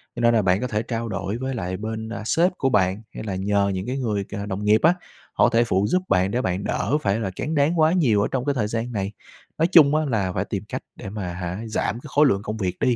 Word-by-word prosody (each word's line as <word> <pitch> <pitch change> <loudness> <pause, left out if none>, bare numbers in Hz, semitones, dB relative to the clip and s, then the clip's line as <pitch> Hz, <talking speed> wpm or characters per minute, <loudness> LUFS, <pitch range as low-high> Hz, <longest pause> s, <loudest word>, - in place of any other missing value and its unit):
Cho - - -6
nên 120 0 +4
là 115 - +4
bạn 95 +1 +2
có 125 - -1
thể 105 -2 -1
trao 115 0 -3
đổi 100 +1 -3
với 130 +2 -3
lại 95 -4 -3
bên, 110 +2 -5
a, 115 - -5
sếp 170 +10 +3
của 135 - +1
bạn, 95 -3 +1
hay - - -6
là 100 -3 -3
nhờ 100 +1 +1
những 95 0 -3
cái 130 +2 -2
người, 110 -6 -1
cà, 100 0 -5
đồng 100 0 -4
nghiệp 105 +1 +4
á, 165 +3 +5 0.4
họ - - +4
thể 115 +1 +3
phụ 100 -3 +1
giúp 185 +8 +2
bạn 95 +1 +2
để 125 - 0
bạn 95 -1 -2
đỡ 145 - 0
phải 100 -1 +1
là 100 -4 -2
tráng 155 +9 -3
đáng 150 +4 +2
quá 155 0 +5
nhiều 125 - +3
ở - - +1
trong 130 -1 -1
cái 145 -1 0
thời 110 -5 0
gian 115 +2 -3
này. 100 -3 -2 0.5
Nói 165 - +3
chung 155 -5 +6
á 155 0 +2
là 105 -9 0
phải - - -1
tìm - - -4
cách - - -4
để - - -8
mà, 100 -2 -5
hả, 90 +1 -4
giảm 110 0 -2
cái - - -11
khối 150 +1 +4
lượng 100 -8 +2
công 110 0 -4
việc 95 -4 -3
đi, 125 - +2
110 Hz, 285 wpm, -23 LUFS, 100-130 Hz, 0.5 s, chung